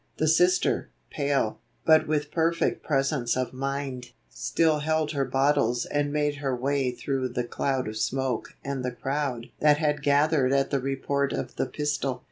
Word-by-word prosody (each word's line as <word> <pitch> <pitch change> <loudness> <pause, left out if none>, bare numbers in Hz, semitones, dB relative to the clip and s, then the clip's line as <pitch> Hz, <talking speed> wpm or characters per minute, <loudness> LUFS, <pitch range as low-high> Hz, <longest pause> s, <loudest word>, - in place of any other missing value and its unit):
The 155 - +1
Sister, 180 +3 +3 0.2
pale, 140 -6 0 0.3
but 160 -1 +5
with 150 -1 -1
perfect 165 0 0
presence 135 -4 0
of 130 -1 -2
mind, 135 -2 -4 0.2
still 150 - +1
held 155 0 0
her 140 -3 0
bottles 135 -4 +2
and 145 0 -1
made 150 -1 0
her 135 -3 -1
way 135 +1 0
through 130 +1 -2
the 125 - -2
cloud 130 +1 -1
of 110 0 -5
smoke 130 +2 -2
and 140 -2 -3
the 125 -1 -2
crowd 135 -3 -3
that 150 -1 +5
had 150 -2 0
gathered 145 -1 +3
at 135 0 +1
the 140 - +2
report 135 +1 -1
of - - -4
the - - -1
pistol. 145 -3 -2
140 Hz, 165 wpm, -26 LUFS, 130-150 Hz, 0.3 s, but